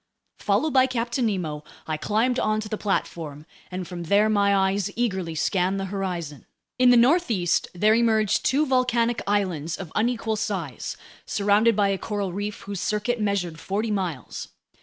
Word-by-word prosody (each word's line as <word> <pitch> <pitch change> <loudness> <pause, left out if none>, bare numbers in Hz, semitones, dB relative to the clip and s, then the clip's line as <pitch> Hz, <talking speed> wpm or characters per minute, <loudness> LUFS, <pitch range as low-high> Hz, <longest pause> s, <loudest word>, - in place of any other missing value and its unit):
Followed 310 -3 +1
by 260 -1 +5
Captain 240 0 -1
Nemo, 160 -8 -3 0.2
I 155 - -2
climbed 225 +10 0
onto 215 0 0
the 215 - -3
platform, 160 -7 -3 0.2
and 185 -1 -5
from 175 -2 -6
there 205 +5 +3
my 200 -1 +3 0.2
eyes 200 0 -1
eagerly 190 -8 -1
scanned 185 +4 +1
the 195 - -2
horizon. 175 -7 -4 0.3
In 250 0 +6
the 245 - +7
northeast 235 - +3
there 210 +5 +4
emerged 220 -3 +2
two 290 +4 +2
volcanic 240 -3 +1
islands 180 -6 0
of 180 -5 -8
unequal 225 -1 0
size, 175 - -4 0.3
surrounded 210 +3 +3
by 200 -1 +3
a 195 -1 -1
coral 205 -4 -3
reef 205 +2 -4
whose 200 -2 -5
circuit 215 +2 -1
measured 185 -6 -1
forty 210 +5 -2
miles. 180 -10 -3
205 Hz, 160 wpm, -25 LUFS, 180-230 Hz, 0.3 s, the